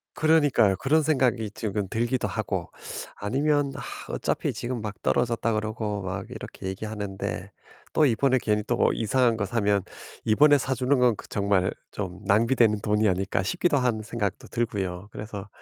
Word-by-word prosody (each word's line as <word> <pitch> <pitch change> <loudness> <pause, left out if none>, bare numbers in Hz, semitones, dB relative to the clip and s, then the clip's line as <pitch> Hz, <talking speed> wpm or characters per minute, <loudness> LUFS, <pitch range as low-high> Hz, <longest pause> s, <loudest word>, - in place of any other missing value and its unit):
그러니까요. 145 -11 +4
그런 155 +8 +2
생각이 125 -7 +1
지금 105 -3 -3
들기도 120 +4 0
하고 - - -3 0.5
아니면 140 +6 +1
"아 - - -7
어차피 - - -1
지금 120 -1 -4
막 105 -1 -6
떨어졌다." 115 -1 +1
그러고 110 -1 -2
막 90 0 -4
이렇게 - - -8
얘기하는데 100 -1 -4 0.4
또 155 - +5
이번에 130 +1 +3
괜히 105 -2 +1
또 - - -1
뭐 - - +3
이상한 120 +1 +2
거 100 - -1
사면 100 -2 +1 0.4
'이번에 145 +7 +5
사 130 0 -1
주는 130 +2 +2
건 120 -4 +4
그 - - -11
정말 100 -2 +1 0.2
좀 95 -3 -5
낭비되는 110 +1 +3
돈이 105 +1 +2
아닐까?' 95 +1 0
싶기도 145 - +1
한 120 -4 0
생각도 105 -4 -3
들고요. 100 -5 -2
그래서 105 -1 -7
110 Hz, 345 characters per minute, -26 LUFS, 100-125 Hz, 0.5 s, 또